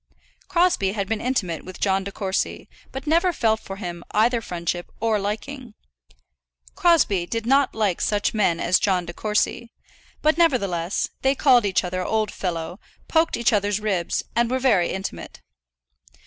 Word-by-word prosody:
Crosbie 340 - +2
had 200 -2 -2
been 220 0 -2
intimate 195 - -1
with 185 0 -10
John 195 -1 +1
De 200 - -6
Courcy, 195 -1 -2 0.2
but 265 +2 -7
never 335 +4 +3
felt 220 -8 +1
for 195 - -8
him 175 -3 -6
either 230 +2 +2
friendship 175 -2 -4
or 225 -1 +1
liking. 225 +4 -5 1.0
Crosbie 230 - +3
did 230 +2 -3
not 270 +2 +3
like 210 -5 0
such 205 -1 0
men 190 -6 +1
as 175 +1 +3
John 185 -3 +1
De 175 - -7
Courcy; 215 +4 -1 0.5
but 310 +2 +3
nevertheless, 200 - +1
they 270 +1 +2
called 250 -6 +4
each 190 - +1
other 185 0 -3
old 215 +1 0
fellow, 175 0 -4 0.3
poked 325 0 +2
each 235 0 +2
other's 205 0 +1
ribs, 195 -5 -1
and 235 0 +2
were 260 - +1
very 225 -10 +2
intimate. 190 +1 -6
210 Hz, 160 wpm, -23 LUFS, 185-250 Hz, 1.0 s, called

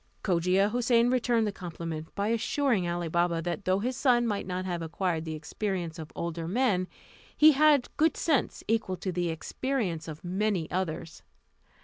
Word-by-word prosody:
Cogia 185 +2 +2
Houssain 240 0 +3
returned 240 -3 +2
the 210 - -1
compliment 165 -4 -6
by 200 +1 0
assuring 230 -4 +1
Ali 175 0 -2
Baba 170 +1 +1
that 175 +4 -3
though 185 +1 +3
his 245 +6 -2
son 245 -2 +3
might 205 -5 -2
not 185 0 -3
have 175 -2 -3
acquired 165 0 -2
the 160 -1 -4
experience 170 +1 -4
of 155 -1 -8
older 170 -1 -4
men, 195 -3 +1 0.5
he 310 +1 +8
had 290 -2 +4
good 315 +1 +3
sense 295 -7 0
equal 220 -4 0
to 185 - -3
the 175 -1 -1
experience 175 - -2
of 155 -1 -8
many 185 -1 0
others. 170 -2 -3
185 Hz, 165 wpm, -28 LUFS, 170-235 Hz, 0.5 s, he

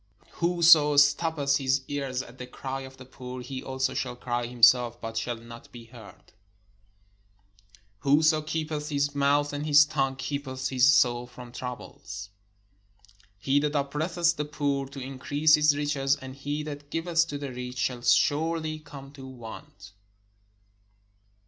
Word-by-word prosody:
Whoso 165 -4 +5
stoppeth 145 -1 +3
his 135 0 0
ears 135 -2 -3
at 125 +1 -15
the 125 - -7
cry 135 +1 -6
of 130 0 -11
the 130 - -12
poor, 125 -1 -9
he 130 +1 -6
also 130 0 -2
shall 125 -2 -3
cry 120 -1 -3
himself, 120 0 +4
but 115 -1 -7
shall 115 +1 -2
not 115 +1 -13
be 120 -1 -11
heard. 115 -3 -15 1.7
Whoso 155 +4 +3
keepeth 155 -1 -4
his 145 -1 0
mouth 145 +1 +1
and 145 0 -3
his 150 0 +6
tongue 135 -3 -1
keepeth 135 -1 -4
his 130 +2 +5
soul 120 -3 +2
from 125 -1 -12
troubles. 105 -5 -8 1.1
He 135 +7 +1
that 150 +1 -1
oppresseth 165 +4 0
the 150 - -2
poor 145 -2 -2
to 140 +1 -10
increase 135 +3 +1
his 150 -1 +5
riches, 140 -2 +1
and 130 -1 -10
he 145 +2 -4
that 145 -1 -8
giveth 165 +1 +1
to 145 - -5
the 140 -2 -6
rich, 125 0 -7
shall 125 -1 -1
surely 155 +7 +1
come 140 -2 -12
to 135 -2 -11
want. 110 -5 -11
135 Hz, 150 wpm, -27 LUFS, 125-150 Hz, 1.7 s, his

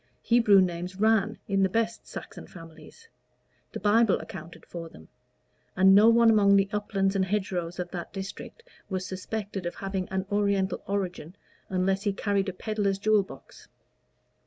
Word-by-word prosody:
Hebrew 230 -5 +5
names 180 0 -2
"ran" 220 -2 +2
in 195 -1 +1
the 190 - +3
best 230 +3 -2
Saxon - - -9
families; 165 - -14 0.6
the - - -6
Bible 215 +1 +3
accounted 170 -2 -10
for 165 -1 -8
them; 80 - -16 0.7
and 190 +1 +6
no 210 +3 +7
one 230 0 +5
among 200 -2 +5
the 195 0 +3
uplands 200 -1 0
and 195 - +2
hedgerows 185 -3 -2
of 180 -1 -5
that 175 -2 -6
district 195 - -8 0.3
was 185 -2 -3
suspected 195 0 -5
of 175 - -5
having 195 -1 -4
an 190 0 -2
oriental 200 -2 0
origin 185 -4 -3 0.3
unless 190 +1 0
he 205 -1 -1
carried 200 -1 -1
a - - -5
peddler's 205 0 -1
jewel 210 +1 +3
box. 195 - -13
195 Hz, 160 wpm, -27 LUFS, 185-210 Hz, 0.7 s, no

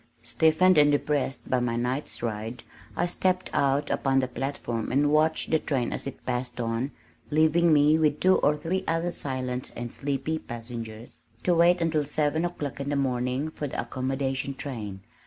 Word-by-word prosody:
Stiffened 160 +9 +4
and 145 0 +6
depressed 145 -1 -1
by 130 - +2
my 120 -1 -1
night's 125 +2 -3
ride, 115 +1 -4 0.3
I 175 - +1
stepped 185 +1 0
out 140 +1 +1
upon 135 -1 +2
the 130 - 0
platform 125 -3 -3
and 145 +2 +3
watched 155 +1 +2
the 160 - +4
train 130 -6 -1
as - - -5
it 135 - -8
passed 125 0 -3
on, 115 +3 -1 0.4
leaving 160 +2 +4
me, 150 +1 +5
with 150 -2 +2
two 185 0 +4
or 150 +1 +2
three 180 +5 -2
other 165 +2 0
silent 130 -4 -4
and 120 0 -5
sleepy 140 +3 -2
passengers, 115 -2 -8 0.2
to 180 - +3
wait 170 +1 +4
until 160 -2 +1
seven 150 +3 0
o'clock 150 -6 -4
in 140 0 -3
the 145 - 0
morning 130 +2 0
for 150 - -4
the - - -5
"accommodation 135 +2 -2
train." 115 -9 -6
140 Hz, 175 wpm, -27 LUFS, 125-155 Hz, 0.4 s, and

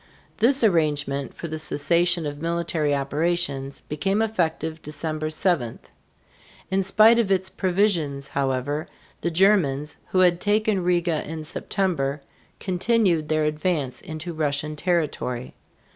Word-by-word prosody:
This 255 +4 +3
arrangement 145 -7 +1
for 170 - -6
the 155 0 -5
cessation 170 +3 +2
of 145 0 -5
military 165 -3 0
operations 140 -1 -1
became 195 +7 -1
effective 165 -7 -1
December 155 +1 -4
7. 155 -7 0 0.9
In 190 0 +2
spite 215 +4 +5
of 210 -4 +1
its 190 0 +1
provisions, 175 -8 0
however, 140 +2 -1 0.3
the 170 - 0
Germans, 160 -6 +2
who 185 - +2
had 175 -1 +3
taken 210 -2 +1
Riga 175 -3 +1
(ree´ga) - - -10
in 160 0 -5
September, 155 -4 -2 0.4
continued 185 -4 +1
their 155 -1 +2
advance 150 -3 -1
into 160 +2 -6
Russian 150 0 -1
territory. 150 -7 -2
160 Hz, 125 wpm, -24 LUFS, 145-185 Hz, 0.9 s, spite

